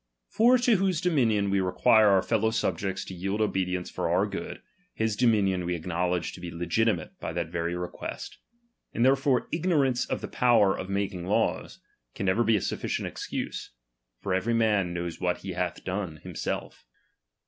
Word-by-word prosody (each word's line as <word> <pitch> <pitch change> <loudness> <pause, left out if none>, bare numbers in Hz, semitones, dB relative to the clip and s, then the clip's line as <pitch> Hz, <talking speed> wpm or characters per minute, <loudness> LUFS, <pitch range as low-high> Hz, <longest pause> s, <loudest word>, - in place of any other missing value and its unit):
For 240 +3 +5
to 240 -3 +3
whose 185 -3 +1
dominion 115 - +2
we 100 - +2
require 110 +4 +4
our 95 -2 +4
fellow 110 -1 +1
subjects 95 -4 -2
to - - -8
yield 95 +3 -3
obedience 90 -4 -1
for - - -2
our - - +3
good, - - -6 0.3
his 110 -1 0
dominion 100 -6 +2
we 90 0 -1
acknowledge 90 +1 -2
to - - -10
be 90 - -5
legitimate 85 +2 0
by - - -4
that 85 -2 -2
very 85 0 -2
request. 90 0 -6 0.6
And 115 - +3
therefore 135 -1 +3
ignorance 145 -7 +1
of - - -3
the - - -4
power 115 -6 +3
of 95 - -6
making 95 -3 -2
laws, - - 0 0.4
can 100 - -3
never 95 +5 +3
be 115 0 +3
a 100 - +1
sufficient - - -2
excuse; - - -5 0.5
for 95 - -2
every 110 +6 +1
man 105 -6 +2
knows 85 -1 -5
what 90 -1 +1
he 95 - -5
hath 90 -1 -3
done 95 -4 -3
himself. - - -5
100 Hz, 170 wpm, -27 LUFS, 90-115 Hz, 0.6 s, For